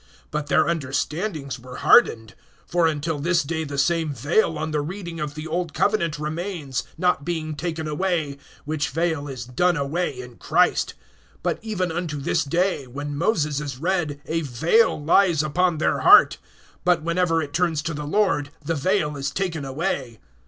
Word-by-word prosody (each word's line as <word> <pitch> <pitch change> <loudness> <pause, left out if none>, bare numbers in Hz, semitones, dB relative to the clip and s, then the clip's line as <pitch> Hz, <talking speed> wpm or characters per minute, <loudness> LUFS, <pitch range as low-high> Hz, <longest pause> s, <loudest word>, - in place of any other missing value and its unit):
(14)But 150 -1 -2
their - - +3
understandings 150 -1 -2
were 125 +1 -10
hardened; 110 - +4 0.3
for 175 -1 +2
until 155 0 -2
this 170 +2 +2
day 160 +2 -2
the 140 -2 -5
same 165 +1 +1
vail 150 - +1
on 155 +1 -3
the 150 -1 0
reading 170 +1 -6
of 150 -1 -4
the 155 +1 -6
old 165 -1 -3
covenant 170 -7 +1
remains, 155 -2 -3 0.2
not 180 -6 +1
being 160 -1 -3
taken 160 0 -4
away; 150 -3 -1 0.3
which 150 0 -1
vail 160 -1 -1
is 130 -4 -6
done 170 +8 +1
away 140 -1 -2
in 125 -2 -10
Christ[3:14]. - - +2 0.5
(15)But - - 0
even 190 -6 -2
unto 165 -3 -3
this 160 +4 0
day, 170 -1 0
when 145 +3 -5
Moses 150 -4 +1
is 145 -4 -5
read, 165 -2 -1
a 165 +1 -1
vail 160 - +2
lies 165 +1 +3
upon 175 +3 +1
their 155 - +1
heart. - - +7 0.4
(16)But 175 -2 +2
whenever 170 0 +1
it 145 -3 -4
turns 165 -3 +1
to 165 - -2
the 150 0 -5
Lord, 155 -6 +1 0.2
the 165 - 0
vail 160 0 0
is 140 -1 -2
taken 175 -6 -2
away. 135 -4 -3
155 Hz, 170 wpm, -23 LUFS, 145-175 Hz, 0.5 s, heart